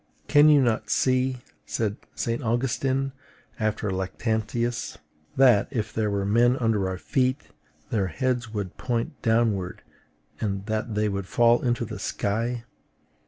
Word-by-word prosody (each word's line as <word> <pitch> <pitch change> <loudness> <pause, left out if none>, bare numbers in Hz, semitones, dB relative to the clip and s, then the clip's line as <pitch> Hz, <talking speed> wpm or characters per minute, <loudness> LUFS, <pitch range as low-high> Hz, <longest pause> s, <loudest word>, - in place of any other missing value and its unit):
"Can 145 +1 +6
you 145 -3 +6
not 110 -3 0
see," 130 -1 +1 0.2
said 105 -3 -2 0.2
St. 115 0 -2
Augustine 130 +3 0 0.5
after 105 -2 -1
Lactantius, 110 +5 -2 0.4
"that, 125 -6 +5
if 110 -5 -3
there 110 -1 0
were 100 -1 -1
men 120 +5 +3
under 110 -6 +1
our 95 - -3
feet, 130 - -1 0.4
their 100 -4 +1
heads 120 +6 -1
would 100 -4 -4
point 120 +2 -3
downward, 110 -5 +1 0.6
and 100 -2 -2
that 110 0 -2
they 105 0 +1
would 100 -2 -3
fall 120 +2 +4
into 120 -1 0
the 110 -4 -7
sky?" 115 +5 -2
115 Hz, 135 wpm, -26 LUFS, 105-125 Hz, 0.6 s, Can